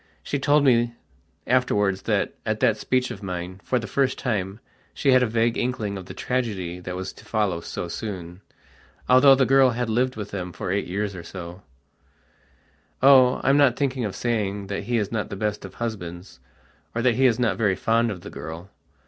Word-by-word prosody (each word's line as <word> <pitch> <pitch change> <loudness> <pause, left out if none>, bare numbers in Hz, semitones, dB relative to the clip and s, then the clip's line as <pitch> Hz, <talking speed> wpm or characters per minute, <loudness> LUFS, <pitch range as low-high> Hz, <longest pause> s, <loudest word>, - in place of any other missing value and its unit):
she 140 - -2
told 145 +1 +3
me 120 -3 +3 0.5
afterwards 105 -6 +1
that, - - 0
at - - -2
that - - +3
speech 130 0 0
of - - -8
mine, 90 0 -5
for 125 - 0
the 115 - -3
first 130 +5 0
time 100 -4 -2 0.4
she 140 - +2
had 130 0 +6
a 125 - +2
vague 115 +1 +1
inkling 110 -5 -2
of 95 -2 -8
the - - -8
tragedy 100 -9 -2
that 90 0 -6
was 95 0 -5
to - - -16
follow 100 -6 -1
so 90 - -5
soonalthough 105 +8 0
the 130 - +4
girl 135 0 +5
had 120 -1 -2
lived 125 +3 +1
with 105 -2 -6
them 90 -3 -4
for 90 - -4
eight 100 +1 -1
years 100 +3 -2
or 90 - -7
so: 85 +1 -9 1.4
"Oh, 130 -2 +6
I'm 135 +1 +4
not 140 -4 +5
thinking 135 -3 -1
of 105 -3 -3
saying 105 -4 -1
that - - -4
he 120 0 0
is 105 -3 -1
not 110 -2 -2
the - - -5
best 105 0 -3
of 95 - -11
husbands, 90 - -6 0.6
or 120 - -1
that 125 -2 +4
he 130 +3 +4
is 115 -3 +2
not 120 -5 +1
very 105 -4 +2
fond 115 +4 +1
of 95 -5 -5
the - - -9
girl." 80 +6 -8
110 Hz, 200 wpm, -24 LUFS, 95-125 Hz, 1.4 s, had